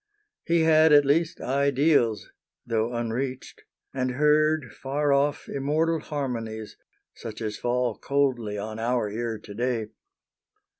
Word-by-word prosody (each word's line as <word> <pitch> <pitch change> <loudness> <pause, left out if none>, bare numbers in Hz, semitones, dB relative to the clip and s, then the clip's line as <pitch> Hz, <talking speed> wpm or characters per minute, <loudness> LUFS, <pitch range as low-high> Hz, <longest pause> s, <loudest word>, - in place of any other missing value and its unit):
He 170 0 +2
had 160 0 +5
at 145 -1 +7
least 160 +4 +1
ideals, 140 -4 +1 0.3
though 115 0 0
unreached, 125 +2 -4 0.3
And 130 -1 -1
heard, 150 -2 +2
far 140 +2 0
off, 145 +2 +1
immortal 155 +4 0
harmonies, 115 -8 -5 0.4
Such 110 -2 -8
as 110 -2 -4
fall 120 -3 -1
coldly 130 -7 0
on 110 +2 -5
our 115 -2 0
ear 115 +1 -3
to 105 -1 -11
day. 115 -1 -2
130 Hz, 120 wpm, -26 LUFS, 115-145 Hz, 0.4 s, at